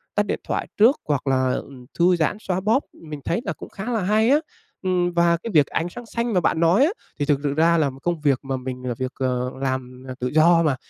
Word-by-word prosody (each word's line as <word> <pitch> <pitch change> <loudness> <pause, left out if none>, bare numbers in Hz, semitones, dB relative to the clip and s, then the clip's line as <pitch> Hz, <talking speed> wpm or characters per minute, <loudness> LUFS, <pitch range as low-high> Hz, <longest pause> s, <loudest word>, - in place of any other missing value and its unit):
tắt 205 - +2
điện - - -2
thoại - - -2
trước 230 +7 +6
hoặc 145 -2 -1
là, 130 -1 +2
ừm, 130 -3 -7
thư 180 +1 +5
giãn, 170 +4 0
xoa 185 -3 -2
bóp, 225 +8 +2
mình 150 -3 -9
thấy 230 - 0
là - - -2
cũng - - -11
khá 210 +5 -5
là 225 -3 0
hay 215 +4 +3
á. 290 +3 +5 0.4
Ừm, 180 -2 0
và 170 0 +3
cái 230 - -4
việc 150 -6 +4
ánh 165 +2 -2
sáng 240 +6 -9
xanh 235 0 -2
mà 180 - +4
bạn 165 - +1
nói 170 +10 +4
á, 335 - +1 0.3
thì 145 - +1
thực 145 -1 +2
sự 140 - 0
ra 165 +3 +3
là 150 -3 +2
công 170 -3 -1
việc 140 -4 +2
mà 135 -1 -2
mình 130 0 -6
là 120 - -1
việc, 130 0 -3
ờ, 125 -1 -1
làm, 130 -1 -3
ờ, 130 - -5
tự 125 - -1
do 165 +4 +4
mà, 150 -4 +2
165 Hz, 260 wpm, -23 LUFS, 135-195 Hz, 0.4 s, trước